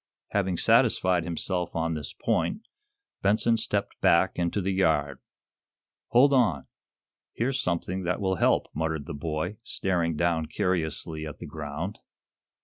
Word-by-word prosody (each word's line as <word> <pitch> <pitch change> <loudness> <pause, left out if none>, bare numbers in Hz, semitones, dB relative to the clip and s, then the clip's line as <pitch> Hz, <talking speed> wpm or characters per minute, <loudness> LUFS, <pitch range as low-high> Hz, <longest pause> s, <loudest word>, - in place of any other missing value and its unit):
Having 95 -3 0
satisfied 90 0 +3
himself 90 +1 -2
on 80 0 0
this 75 -3 -5
point, 145 - -1 0.5
Benson 110 +3 +3
stepped - - -1
back - - +3
into 85 +3 0
the 95 0 -1
yard. 75 -7 +1 0.9
"Hold 135 +4 +5
on! 105 - +2 0.7
Here's 130 +3 0
something 90 +2 -1
that 90 0 -1
will 95 -2 0
help," - - +3
muttered 80 -1 -2
the 85 - -6
boy, 80 +6 -3
staring 85 -7 -1
down 80 -1 0
curiously 80 -3 -2
at 75 - -8
the - - -8
ground. 80 +6 -5
85 Hz, 135 wpm, -27 LUFS, 80-95 Hz, 0.9 s, Hold